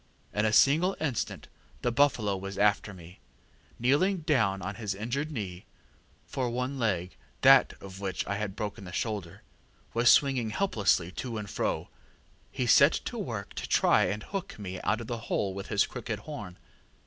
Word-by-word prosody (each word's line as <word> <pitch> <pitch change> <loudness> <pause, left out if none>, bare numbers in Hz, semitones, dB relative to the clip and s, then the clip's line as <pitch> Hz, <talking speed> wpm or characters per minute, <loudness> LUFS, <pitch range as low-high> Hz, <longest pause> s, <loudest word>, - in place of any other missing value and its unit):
In 105 +1 +1
a 110 - +2
single 160 - +4
instant 140 -7 -3 0.4
the 120 - +1
buffalo 120 -6 +2
was 95 +1 -6
after 105 0 +2
me. 90 -1 -13 0.6
Kneeling 155 +10 +2
down 115 -11 +2
on 100 +2 -3
his 105 -1 -4
uninjured 130 +9 -3
knee 95 -9 -6 0.6
for 130 -2 -2
one 125 +3 -3
leg, 95 -6 -1 0.3
that - - +7
of 95 0 -10
which 95 -2 -3
I 100 +1 -2
had 105 -2 -4
broken 105 0 -5
the 90 - -8
shoulder, 100 -5 -4 0.5
was 120 +1 +4
swinging 135 -5 +3
helplessly 100 - +1
to 120 +3 -5
and 105 -1 -5
fro - - -2 0.6
he - - -2
set - - +6
to - - -4
work - - -5
to - - -6
try - - +4
and 105 +4 -3
hook 195 -3 -5
me 95 -3 -6
out 110 +2 0
of - - -6
the 115 +1 -4
hole 95 -2 0
with 100 +1 -6
his 105 -1 +2
crooked 115 -4 -5
horn. 105 -10 -8
105 Hz, 170 wpm, -29 LUFS, 100-125 Hz, 0.6 s, that